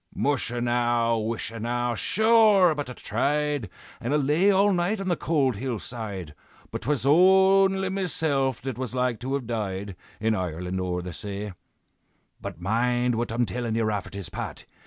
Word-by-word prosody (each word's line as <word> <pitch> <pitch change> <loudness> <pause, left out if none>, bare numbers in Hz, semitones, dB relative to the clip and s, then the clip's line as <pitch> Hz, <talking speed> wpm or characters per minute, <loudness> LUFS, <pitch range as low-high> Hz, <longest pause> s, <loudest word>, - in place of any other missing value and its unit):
"Musha 130 -4 0
now! 120 -1 +1
wisha 115 +1 -4
now! 120 +2 -1
sure 215 - +4
but 145 -3 -4
I - - -6
tried, 145 +1 -1 0.3
And 130 +5 -1
I - - +4
lay 150 +7 +3
all 200 +1 +4
night 180 +4 0
on 195 -1 -3
the 175 - +2
cold 140 -9 0
hill 125 +1 -3
side, 100 -9 -6 0.4
But - - -4
'twas 140 -1 -1
only 190 +4 +5
mesilf 155 -9 -1
that 130 -3 -4
was 130 -1 -4
like 125 -2 0
to 130 +3 -2
have 140 -3 -3
died, 100 -4 -4 0.2
In 110 +1 +1
Ireland 90 -1 -3
o'er 90 -1 -2
the 90 -1 -6
say. 100 +1 -5 0.9
"But - - -7
mind 120 +6 +1
what 115 0 -2
I'm 120 +1 +1
tellin' 115 +3 -3
ye, 115 - +1
Rafferty's 100 -3 -3
Pat! 110 +5 -6
120 Hz, 165 wpm, -26 LUFS, 110-150 Hz, 0.9 s, only